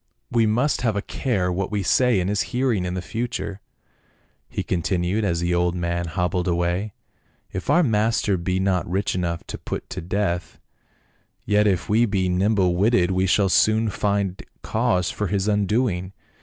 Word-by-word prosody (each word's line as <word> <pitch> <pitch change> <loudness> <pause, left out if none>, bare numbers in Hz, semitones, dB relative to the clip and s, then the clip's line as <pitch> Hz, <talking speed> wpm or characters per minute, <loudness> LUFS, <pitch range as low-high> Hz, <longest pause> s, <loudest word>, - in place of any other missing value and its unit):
" - - -49
We 115 -2 +3
must 125 +7 +1
have 115 -4 +1
a 100 - 0
care 95 -9 -1
what 95 +1 -2
we 105 -2 -1
say 125 +2 +3
in 90 - -1
his 100 +1 +1 0.2
hearing 120 -8 +1
in 90 0 -3
the 90 - -4
future," 115 -2 -4 0.9
he - - -3
continued, 90 +3 -1
as 85 -4 0
the 85 0 0
old 90 0 +1
man 85 0 -2
hobbled 90 +1 -1
away; 90 +4 0 0.3
" - - -39
if 95 - -5
our 175 - +5
master 110 -4 +1
be 90 +1 -1
not 95 -4 0
rich 95 +3 0
enough 85 -2 -2
to - - -7
put - - -5
to - - -4
death, 90 0 -2 0.9
yet 105 +1 +3
if 95 -4 0
we 115 +3 +3
be 95 -3 0
nimble 95 -1 +2
witted 95 -2 +3
we 95 0 +1
shall 100 +2 +3
soon 110 +3 +3
find 100 -2 -1 0.2
cause 110 -6 0
for 105 - -2
his 100 +1 -1
undoing. 105 -2 0
95 Hz, 180 wpm, -23 LUFS, 90-105 Hz, 0.9 s, our